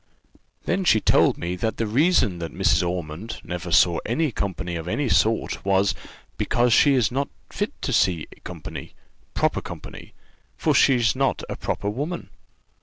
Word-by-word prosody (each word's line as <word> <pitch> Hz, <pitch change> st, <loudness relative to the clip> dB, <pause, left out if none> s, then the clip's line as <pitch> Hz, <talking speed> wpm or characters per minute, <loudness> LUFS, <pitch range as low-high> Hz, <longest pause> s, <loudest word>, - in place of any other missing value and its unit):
Then 195 Hz, -, 0 dB
she 110 Hz, -11 st, +4 dB
told -, -, +3 dB
me 85 Hz, +1 st, -3 dB
that 110 Hz, +3 st, -2 dB
the 115 Hz, -, 0 dB
reason 120 Hz, -, +2 dB
that 85 Hz, -1 st, -5 dB
Mrs. -, -, +2 dB
Ormond 90 Hz, +3 st, -4 dB
never 90 Hz, 0 st, -5 dB
saw 85 Hz, +1 st, +4 dB
any 145 Hz, +6 st, 0 dB
company 95 Hz, -4 st, -3 dB
of 80 Hz, 0 st, -5 dB
any 140 Hz, +9 st, -1 dB
sort 115 Hz, -1 st, +1 dB
was, 95 Hz, +1 st, +2 dB, 0.5 s
because 120 Hz, -1 st, +2 dB
she 140 Hz, +2 st, +5 dB
is 125 Hz, -3 st, +2 dB
not 140 Hz, +3 st, -1 dB, 0.2 s
fit 210 Hz, +7 st, -3 dB
to 135 Hz, -, -1 dB
see 90 Hz, -7 st, +2 dB, 0.2 s
company -, -, -8 dB, 0.4 s
proper -, -, +1 dB
company -, -, -10 dB, 0.4 s
for -, -, +1 dB
she's 120 Hz, -4 st, +4 dB
not 135 Hz, +1 st, 0 dB
a -, -, -3 dB
proper 100 Hz, -, -3 dB
woman. 145 Hz, +12 st, -4 dB
110 Hz, 160 wpm, -24 LUFS, 90-135 Hz, 0.5 s, she